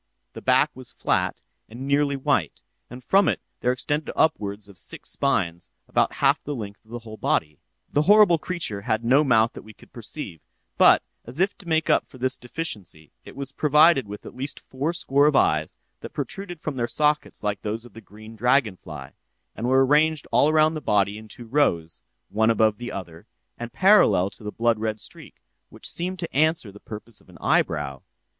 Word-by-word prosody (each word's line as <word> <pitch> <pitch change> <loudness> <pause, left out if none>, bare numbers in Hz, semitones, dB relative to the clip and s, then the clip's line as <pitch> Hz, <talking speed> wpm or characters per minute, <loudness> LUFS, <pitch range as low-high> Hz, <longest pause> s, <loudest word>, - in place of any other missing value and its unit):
The - - -9
back - - +3
was 130 -1 -9
flat - - -1 0.3
and 120 +4 -8
nearly 140 0 +2
white, 135 - -1 0.3
and 125 +1 -10
from 195 +9 +4
it - - +1 0.2
there 125 - +1
extended 145 +4 -2
upwards 105 -10 0
of 100 -3 -10
six - - -5
spines, 85 0 -1 0.2
about - - +1
half - - +2
the 145 - -4
length 100 -4 -8
of 110 - -27
the 120 - -5
whole 110 -2 -10
body. 80 - -1 0.3
"'This 150 +2 +2
horrible 205 -5 +6
creature 155 - -3
had 110 +2 -1
no 135 +5 +5
mouth 115 -5 +3
that - - -9
we 110 0 -14
could - - -20
perceive; 110 - -6 0.3
but, - - +6 0.2
as 125 +6 -8
if 195 +2 +2
to 180 - -13
make 160 -1 +1
up - - +2
for - - -15
this 130 +1 -1
deficiency, 105 - -6
it - - -12
was 140 0 -6
provided 150 -3 +4
with 105 +1 -9
at - - -9
least 135 +3 -5
four 140 +5 -3
score 145 -4 +2
of 150 - +2
eyes, 80 - +2 0.2
that - - -9
protruded 175 -5 -6
from 150 -4 -4
their 120 -1 0
sockets 150 0 0
like 105 -2 -2
those 110 +2 -4
of 120 - -15
the 115 - -11
green 110 +2 -13
dragon 120 -2 +2
fly, 75 -6 -10 0.4
and 115 - -3
were 130 +1 +4
arranged 150 +2 +3
all 145 - +4
around 155 0 +4
the 155 - -5
body 100 -3 +1
in 110 - -13
two 120 +3 -12
rows, 110 - 0 0.3
one 110 +3 +2
above 110 -1 +2
the 120 0 -5
other, 85 -4 -8 0.3
and 120 0 -7
parallel 190 - +4
to - - -16
the 105 - -4
blood 115 0 +1
red 110 -1 -2
streak, - - -10 0.3
which - - -7
seemed 180 +2 -3
to 170 -6 -6
answer 155 -7 +2
the 105 - -14
purpose 110 +1 -9
of - - -25
an - - -14
eyebrow. 75 -4 0
120 Hz, 200 wpm, -24 LUFS, 105-150 Hz, 0.4 s, horrible